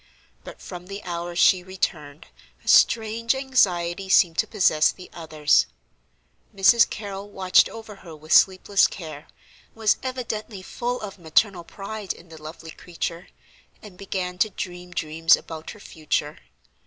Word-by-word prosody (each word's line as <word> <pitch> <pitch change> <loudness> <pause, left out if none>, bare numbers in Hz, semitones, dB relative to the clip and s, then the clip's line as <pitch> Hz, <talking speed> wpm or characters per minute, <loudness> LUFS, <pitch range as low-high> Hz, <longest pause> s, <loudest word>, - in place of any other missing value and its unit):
But - - -12
from 180 -1 -9
the 200 +1 -8
hour 175 0 -5
she 180 +1 +5
returned 165 -6 -4 0.4
a - - -22
strange 230 +2 +3
anxiety 190 -9 +1
seemed 170 -3 +4
to 220 - +2
possess 175 -8 +3
the 180 - -14
others. 155 -3 +2 0.9
Mrs. 230 +4 +5
Carrol 200 -1 -7
watched 190 -2 +3
over 220 -2 -10
her 170 -4 -12
with 155 +1 -3
sleepless 195 +1 +4
care, 155 -4 -9 0.5
was 220 -2 +2
evidently 225 -6 -5
full 245 +5 -3
of 205 -2 -8
maternal 175 +3 +1
pride 200 +2 -6
in 170 - -17
the 160 -1 -13
lovely 160 +1 -10
creature, 170 +1 -6 0.6
and 210 -4 -12
began 180 -1 -5
to 215 - +3
dream 180 -2 -7
dreams 165 0 +2
about 160 -1 -9
her - - -10
future. 155 -4 -3
185 Hz, 140 wpm, -24 LUFS, 165-210 Hz, 0.9 s, she